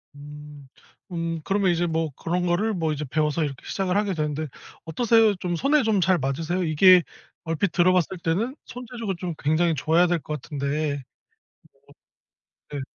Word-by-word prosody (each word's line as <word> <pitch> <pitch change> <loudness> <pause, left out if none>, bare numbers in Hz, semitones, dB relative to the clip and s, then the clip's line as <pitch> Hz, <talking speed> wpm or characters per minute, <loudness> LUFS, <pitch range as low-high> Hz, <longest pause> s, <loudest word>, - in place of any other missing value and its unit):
음. 145 -1 -11 0.4
음. 165 -1 -3
그러면 195 -2 +1
이제 175 0 +1
뭐 160 -1 -1
그런 175 +2 -2
거를 200 +6 +1
뭐 160 -4 -1
이제 150 +1 -4
배워서 155 +3 0
이렇게 135 -3 -5
시작을 190 -2 -2
하게 205 -2 0
되는데, 155 -1 -2 0.4
어떠세요? 220 +4 +3
좀 175 -1 -3
손에 285 - +2
좀 215 -4 +2
잘 180 +1 +3
맞으세요? 160 +7 -2
이게 175 +3 +6 0.4
얼핏 165 +3 -1
들어봤을 180 +1 +2
때는 200 - -1
손재주가 235 -4 -5
좀 180 -2 -3
굉장히 160 +3 +1
좋아야 165 +5 +3
될 175 -1 +1
것 150 -2 -6
같은데. 145 0 -2 1.7
뭐 145 - -4
네. - - -4
170 Hz, 325 characters per minute, -24 LUFS, 150-190 Hz, 1.7 s, 이게